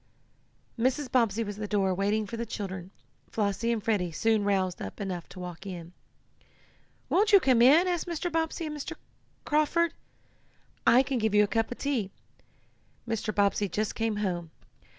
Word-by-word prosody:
Mrs. 260 Hz, +3 st, 0 dB
Bobbsey 230 Hz, -3 st, +2 dB
was 205 Hz, -1 st, -6 dB
at -, -, -10 dB
the 210 Hz, -, -2 dB
door 195 Hz, -2 st, +1 dB
waiting 205 Hz, +3 st, 0 dB
for 205 Hz, -, -6 dB
the 230 Hz, -, -3 dB
children 190 Hz, -4 st, -5 dB, 0.4 s
Flossie 210 Hz, +2 st, 0 dB
and 225 Hz, -3 st, -1 dB
Freddie 200 Hz, -6 st, 0 dB
soon 220 Hz, +5 st, +1 dB
roused 190 Hz, -3 st, 0 dB
up -, -, -7 dB
enough 185 Hz, -4 st, -4 dB
to 180 Hz, +1 st, -11 dB
walk 180 Hz, +2 st, -7 dB
in. 175 Hz, -2 st, -7 dB, 1.1 s
"Won't 420 Hz, +3 st, +3 dB
you 400 Hz, -, +9 dB
come 255 Hz, -8 st, +3 dB
in?" 300 Hz, +9 st, +7 dB
asked 350 Hz, -1 st, -1 dB
Mrs. 345 Hz, +1 st, -3 dB
Bobbsey 325 Hz, +1 st, -1 dB
of 305 Hz, -, -4 dB
Mr. 300 Hz, +3 st, -5 dB, 0.5 s
Carford. 315 Hz, +3 st, +2 dB, 0.9 s
"I 255 Hz, +3 st, +7 dB
can 265 Hz, -2 st, -1 dB
give 220 Hz, -1 st, +1 dB
you 210 Hz, -, +7 dB
a -, -, +1 dB
cup 225 Hz, +2 st, 0 dB
of 245 Hz, -, -5 dB
tea. 255 Hz, -9 st, -1 dB, 1.0 s
Mr. 225 Hz, -1 st, -1 dB
Bobbsey 205 Hz, 0 st, +1 dB
just 210 Hz, +4 st, -1 dB
came 225 Hz, -1 st, -1 dB
home. 180 Hz, -5 st, -2 dB
215 Hz, 170 wpm, -28 LUFS, 195-265 Hz, 1.1 s, you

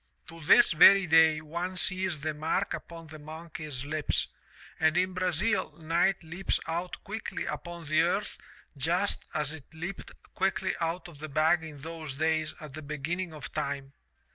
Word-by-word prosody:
* -, -, -44 dB
'To 165 Hz, -2 st, -11 dB
this -, -, +7 dB
very 195 Hz, +4 st, +8 dB
day 160 Hz, -2 st, +5 dB
one 170 Hz, +4 st, -4 dB
sees 185 Hz, -4 st, 0 dB
the 155 Hz, +1 st, -1 dB
mark 160 Hz, +6 st, -1 dB
upon 165 Hz, -1 st, -7 dB
the 155 Hz, 0 st, -11 dB
monkey's 155 Hz, -3 st, -7 dB
lips, 155 Hz, 0 st, 0 dB, 0.5 s
and 160 Hz, +1 st, +3 dB
in 185 Hz, +1 st, +2 dB
Brazil 185 Hz, +4 st, 0 dB
night 170 Hz, +4 st, +1 dB
leaps 170 Hz, +4 st, -1 dB
out 170 Hz, +2 st, -3 dB
quickly 220 Hz, +2 st, -4 dB
upon 170 Hz, -1 st, -6 dB
the 155 Hz, +1 st, +3 dB
earth 185 Hz, +5 st, 0 dB, 0.4 s
just 175 Hz, +8 st, 0 dB
as 150 Hz, 0 st, 0 dB
it 155 Hz, -5 st, -12 dB
leaped 175 Hz, +4 st, -6 dB, 0.2 s
quickly 195 Hz, 0 st, 0 dB
out 165 Hz, +2 st, -2 dB
of 160 Hz, -5 st, -13 dB
the 155 Hz, +1 st, -6 dB
bag 160 Hz, +4 st, +3 dB
in 155 Hz, -2 st, -8 dB
those 155 Hz, -1 st, -6 dB
days 155 Hz, +1 st, +1 dB
at 155 Hz, -3 st, -9 dB
the 155 Hz, -, -6 dB
beginning 155 Hz, +5 st, -3 dB
of 150 Hz, -4 st, -8 dB
time. 140 Hz, -1 st, -3 dB
160 Hz, 165 wpm, -29 LUFS, 155-175 Hz, 0.5 s, very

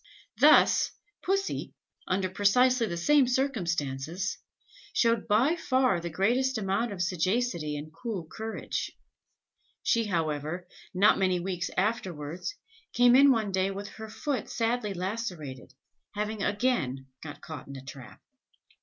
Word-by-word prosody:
Thus, -, -, +6 dB, 0.3 s
Pussy, 390 Hz, +1 st, -1 dB, 0.3 s
under 185 Hz, 0 st, +1 dB
precisely 230 Hz, +6 st, +3 dB
the 170 Hz, -3 st, -4 dB
same 275 Hz, +9 st, +4 dB
circumstances, 180 Hz, -, -1 dB, 0.5 s
showed 230 Hz, -1 st, +2 dB
by 240 Hz, +10 st, +3 dB
far 255 Hz, -, +2 dB
the 170 Hz, -, -4 dB
greatest 240 Hz, +10 st, +1 dB
amount 210 Hz, +3 st, -1 dB
of 185 Hz, -3 st, -2 dB
sagacity 175 Hz, -3 st, 0 dB
and 155 Hz, +2 st, -8 dB
cool 195 Hz, -1 st, -5 dB
courage. 220 Hz, +7 st, -4 dB, 0.9 s
She, 230 Hz, -1 st, +2 dB
however, 165 Hz, -1 st, -2 dB, 0.2 s
not 200 Hz, +3 st, +4 dB
many 185 Hz, -2 st, +2 dB
weeks 180 Hz, 0 st, -3 dB
afterwards, 185 Hz, -, -2 dB, 0.4 s
came 245 Hz, 0 st, +6 dB
in 280 Hz, +2 st, +7 dB
one 220 Hz, -6 st, +2 dB
day 190 Hz, 0 st, +1 dB
with 200 Hz, +1 st, -6 dB
her 220 Hz, 0 st, -9 dB
foot 275 Hz, +1 st, -3 dB
sadly 225 Hz, -3 st, -1 dB
lacerated, 180 Hz, -, -5 dB, 0.4 s
having 210 Hz, 0 st, -2 dB
again 200 Hz, -, 0 dB, 0.2 s
got 150 Hz, -2 st, -8 dB
caught 155 Hz, -2 st, -8 dB
in 140 Hz, -, -8 dB
a 135 Hz, -, -9 dB
trap. 125 Hz, -1 st, -11 dB
195 Hz, 125 wpm, -28 LUFS, 170-235 Hz, 0.9 s, in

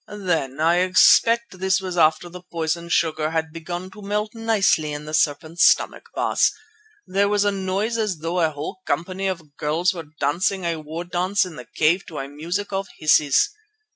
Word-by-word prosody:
Then—I 165 Hz, -5 st, 0 dB
expect 185 Hz, +3 st, +4 dB
this 190 Hz, 0 st, +2 dB
was 185 Hz, -2 st, -5 dB
after 160 Hz, +1 st, +3 dB
the 180 Hz, +1 st, -10 dB
poison 170 Hz, -1 st, -3 dB
sugar 155 Hz, -2 st, +1 dB
had 160 Hz, -1 st, -2 dB
begun 175 Hz, +3 st, -6 dB
to 210 Hz, -, -13 dB
melt 210 Hz, +1 st, -2 dB
nicely 210 Hz, -9 st, +1 dB
in 145 Hz, +1 st, -6 dB
the 155 Hz, -, -8 dB
serpent's 155 Hz, +3 st, +3 dB
stomach, -, -, -1 dB
Baas—there 410 Hz, -, -1 dB
was 205 Hz, 0 st, +2 dB
a 205 Hz, -, +3 dB
noise 200 Hz, +4 st, -2 dB
as 210 Hz, -6 st, -1 dB
though 165 Hz, +3 st, -2 dB
a 165 Hz, -2 st, +3 dB
whole 155 Hz, +5 st, -6 dB
company 185 Hz, +6 st, -2 dB
of 165 Hz, -6 st, -5 dB
girls 160 Hz, +5 st, +1 dB
were 165 Hz, -4 st, -8 dB
dancing 180 Hz, +6 st, 0 dB
a 170 Hz, -1 st, -1 dB
war 155 Hz, +2 st, -6 dB
dance 180 Hz, +3 st, 0 dB
in 180 Hz, -3 st, -9 dB
the 125 Hz, -, -9 dB
cave 170 Hz, +5 st, +3 dB
to 160 Hz, -, -8 dB
a 135 Hz, -, -4 dB
music 170 Hz, +8 st, -4 dB
of 195 Hz, 0 st, -2 dB
hisses. 155 Hz, -, +3 dB
175 Hz, 175 wpm, -22 LUFS, 155-195 Hz, -, expect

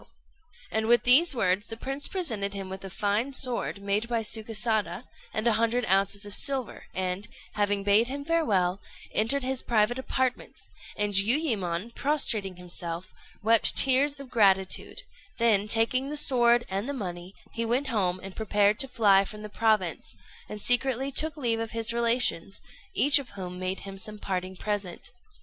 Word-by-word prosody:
] 325 Hz, -3 st, -26 dB
And 220 Hz, 0 st, -1 dB
with 240 Hz, +1 st, +4 dB
these 280 Hz, +5 st, +6 dB
words 195 Hz, -2 st, 0 dB
the 225 Hz, -, -7 dB
prince 270 Hz, +4 st, -1 dB
presented 220 Hz, -, -2 dB
him 195 Hz, -1 st, -6 dB
with 190 Hz, 0 st, -8 dB
a 195 Hz, -, -7 dB
fine 210 Hz, +8 st, -2 dB
sword, 250 Hz, -6 st, -1 dB
made 205 Hz, +3 st, -1 dB
by 230 Hz, -1 st, 0 dB
Sukésada, 220 Hz, 0 st, -1 dB, 0.3 s
and 215 Hz, -, -4 dB
a 235 Hz, -, +3 dB
hundred 235 Hz, +1 st, +1 dB
ounces 195 Hz, +2 st, +1 dB
of 205 Hz, -, -4 dB
silver, 270 Hz, -3 st, 0 dB
and, 185 Hz, +2 st, -3 dB, 0.3 s
having 205 Hz, -1 st, 0 dB
bade 205 Hz, +4 st, +3 dB
him 280 Hz, +2 st, -6 dB
farewell, 200 Hz, -, 0 dB, 0.3 s
entered 245 Hz, +6 st, +1 dB
his 260 Hz, 0 st, -1 dB
private 235 Hz, +2 st, +1 dB
apartments; 260 Hz, -1 st, -3 dB, 0.3 s
and 205 Hz, 0 st, -1 dB
Jiuyémon, 210 Hz, -, 0 dB
prostrating 230 Hz, -11 st, -1 dB
himself, 175 Hz, 0 st, -6 dB, 0.3 s
wept 225 Hz, +1 st, +4 dB
tears 275 Hz, +2 st, +7 dB
of 270 Hz, -3 st, -11 dB
gratitude; 195 Hz, -4 st, +1 dB, 0.3 s
then, 215 Hz, -3 st, +2 dB
taking 230 Hz, +5 st, +1 dB
the 300 Hz, -, -4 dB
sword 240 Hz, -4 st, +4 dB
and 195 Hz, +7 st, -4 dB
the -, -, -2 dB
money, 180 Hz, -5 st, -7 dB, 0.2 s
he 230 Hz, -, -2 dB
went 250 Hz, +4 st, -1 dB
home 185 Hz, -6 st, -1 dB
and 195 Hz, -1 st, -9 dB
prepared 210 Hz, -1 st, +1 dB
to 270 Hz, -, +1 dB
fly 205 Hz, -6 st, +3 dB
from 210 Hz, +2 st, -9 dB
the 210 Hz, -, -7 dB
province, 210 Hz, -6 st, -1 dB, 0.3 s
and 210 Hz, -, -7 dB
secretly 260 Hz, +4 st, +1 dB
took 310 Hz, +3 st, -1 dB
leave 235 Hz, -5 st, 0 dB
of 225 Hz, -1 st, -5 dB
his 230 Hz, 0 st, -3 dB
relations, 235 Hz, -6 st, 0 dB, 0.4 s
each 285 Hz, 0 st, +6 dB
of 275 Hz, -, -9 dB
whom 180 Hz, -1 st, -7 dB
made 185 Hz, +1 st, -4 dB
him 195 Hz, -1 st, -9 dB
some 210 Hz, +2 st, -5 dB
parting 185 Hz, -2 st, -4 dB
present. 205 Hz, -1 st, -5 dB
220 Hz, 170 wpm, -27 LUFS, 195-250 Hz, 0.4 s, tears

